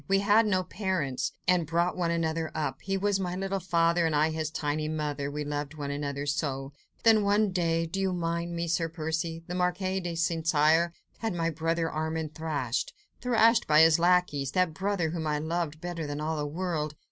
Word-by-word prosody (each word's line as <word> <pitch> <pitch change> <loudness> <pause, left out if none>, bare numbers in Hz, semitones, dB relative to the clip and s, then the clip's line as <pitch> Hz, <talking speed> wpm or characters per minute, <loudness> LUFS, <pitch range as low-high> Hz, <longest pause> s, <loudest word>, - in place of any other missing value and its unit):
We 195 0 +3
had 210 +2 +4
no 185 -3 +2
parents, 180 -9 -2 0.2
and 175 -3 +3
brought 170 +2 +1
one 175 -2 0
another 165 -1 -1
up. 155 -1 -2
He 195 0 -1
was 200 0 +1
my 180 -2 -2
little 195 +1 -2
father, 170 -1 +2
and 160 - 0
I, 155 +2 +3
his 155 -1 -2
tiny 155 0 -2
mother; 150 -2 -2
we 150 +1 -3
loved 145 +1 -4
one 145 -2 -4
another 140 0 -3
so. 140 -2 -2 0.3
Then 225 -2 +6
one 205 0 +3
day—do 165 0 0
you 190 -1 +1
mind 170 -1 -2
me, 170 0 -2
Sir 165 0 0
Percy? 165 0 -3
the 175 - -6
Marquis 185 +1 0
de 175 -2 -4
St. 165 -1 -1
Cyr 160 +2 +4 0.3
had 225 -5 -2
my 165 -1 0
brother 165 +1 0
Armand 160 0 -3
thrashed—thrashed 220 - 0
by 155 0 +6
his 160 0 +6
lacqueys—that 175 -2 +2
brother 190 -3 -1
whom 160 -2 -3
I 150 0 +1
loved 160 0 -2
better 170 -2 -4
than 145 0 -4
all 155 +1 -1
the 145 0 -2
world! 155 -2 -2
165 Hz, 190 wpm, -28 LUFS, 155-180 Hz, 0.3 s, Then